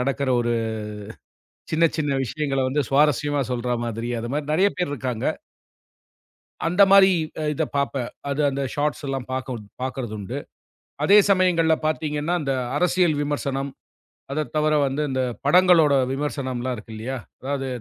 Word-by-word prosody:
நடக்கற 135 +1 -1
ஒரு 120 0 0 1.2
சின்ன 165 +1 +4
சின்ன 145 -2 0
விஷயங்கள 135 +2 -2
வந்து 145 +3 +1
சுவாரஸ்யமா 145 0 +2
சொல்ற 125 0 -2
மாதிரி. 115 +1 -4
அந்த 115 - -4
மாரி 145 0 -2
நெறைய 190 +5 +4
பேர் 180 -5 -1
இருக்காங்க. 125 -4 -3 1.4
அந்த 180 +4 +4
மாரி 195 -1 +8 0.3
அ - - -2
இதப் - - -2
பார்ப்பேன். 135 -3 -1 0.2
அது 140 +2 -1
அந்த 140 0 -3
ஷார்ட்ஸ்லாம் 140 -3 -2
பார்க்குன் 130 -4 -4 0.2
பார்க்கிறதுண்டு. 120 -6 -4 0.7
அதே 205 +5 +7
சமயங்கள்ல 180 -4 +4
பார்த்தீங்கன்னா 155 +1 -1
அந்த 135 -2 -1 0.2
அரசியல் 180 -1 +2
விமர்சனம். 140 -1 -2 0.6
அதத் 155 +1 -3
தவர 155 0 +2
வந்து 135 +2 -1
இந்தப் 130 -2 -2
படங்களோட 175 -5 +5 0.2
விமர்சனம்லாம் 130 -3 -2
இருக்கு 110 +1 -11
இல்லையா? 125 +5 -4 0.2
அதாவது 135 0 -3
140 Hz, 130 wpm, -23 LUFS, 130-155 Hz, 1.4 s, மாரி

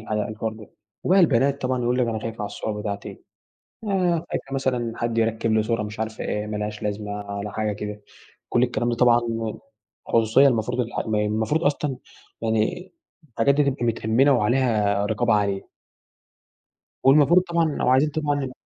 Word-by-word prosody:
الح 110 - -12
الحوار 110 +1 -2
ده، 110 -1 -13 0.3
وبقى 190 +2 +5
البنات 140 -3 +3
طبعًا 125 -1 0
يقول 125 +1 +1
لِك 125 - +2
أنا 110 -1 -2
خايفة 115 +1 -6
على - - -2
الصور 105 +1 -4
بتاعتي، 100 -1 -6 0.6
آآ، 180 -5 0
خايفة 135 - -4
مثلًا 125 -4 -1
حد 115 -1 -2
يركّب 115 0 +1
لي 110 0 +3
صورة 115 -1 -1
مش 105 +1 -7
عارفة 110 0 -4
إيه، 105 0 -2
ما 105 0 -3
لهاش 105 +1 -4
لازمة 105 0 -3
على 100 0 -5
حاجة 110 -1 -1
كده، 105 0 -6 0.5
كُلّ 120 - +3
الكلام 120 -1 0
ده 120 - 0
طبعًا 120 0 +4 0.9
خصوصية، 115 +5 +4
المفروض 125 0 0
الح 120 -1 -2
م 110 - 0
المفروض 110 +9 0
أصلًا 145 -2 0 0.4
يعني 115 +12 -1 0.4
الحاجات 135 +5 +3
دي 150 - +3
تبقى 135 -3 -1
متأمنة 115 +4 +2
وعليها 105 -4 +2
رقابة 115 +2 +1
عالية. 100 -2 0 1.3
والمفروض 150 +6 +6
طبعًا 170 -2 0
لو 150 -5 -1
عايزين 130 +4 +4
تتعلّم 145 -4 -2
115 Hz, 165 wpm, -24 LUFS, 105-135 Hz, 1.3 s, والمفروض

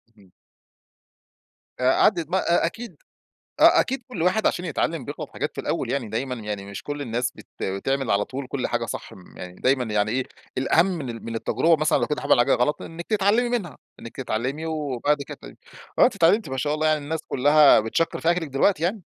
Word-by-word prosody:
امم. 95 -3 -22 1.5
آآ، 125 +1 +3
عدّت 170 -7 +3
بقى، 190 +4 0 0.2
أ - - +4
أكيد 230 +7 -5 0.7
أ - - +7
أكيد 265 -2 -1
كُلّ 200 -10 -6
واحد 185 +5 +2
عشان 180 - -2
يتعلم 160 -2 -2
بيغلط - - -6
حاجات - - -4
في - - -4
الأول - - -2
يعني، 125 -6 -2
دايمًا 125 +4 -3
يعني 105 -3 -5
مش 100 -1 -8
كُلّ 145 0 -5
الناس 120 -1 -2
بت - - -14 0.2
بتعمل 135 +7 -1
على 100 0 +2
طول 135 0 -6
كُلّ 130 -1 -2
حاجة 120 -1 -1
صح، - - -7
م 90 - -16
يعني 90 0 -8
دايمًا 130 +5 +1
يعني 105 -2 0
إيه 130 +2 0 0.3
الأهم 160 +6 +3
من 165 -9 -3
ال 115 -1 -7
من 115 0 -5
التجربة 130 +9 +2
مثلًا 155 0 +2
لو - - -1
كنتِ 150 - -2
عمل - - +3
حاجة 120 - +4
غلط 125 +5 0
إنِّك 170 +1 -8
تتعلمي 215 +3 +2
منها، 200 - -3 0.2
إنِّك 115 - -10
تتعلمي 130 +5 -3
وبعد 150 -2 -1
كده - - -8
ت - - -26 0.5
وآه - - +7
أنتِ 245 - +1
اتعلمتِ 195 0 +3
ما 130 - -4
شاء 145 +3 0
الله 155 +1 0
يعني 155 -1 +2
الناس 160 +3 -4
كلّها 145 +1 +5
بتشكّر 115 +10 -1
في 170 - +2
أكلِك 175 -2 -2
دلوقتي 150 +5 +1
يعني، 190 +4 -1
145 Hz, 210 wpm, -24 LUFS, 120-170 Hz, 1.5 s, أ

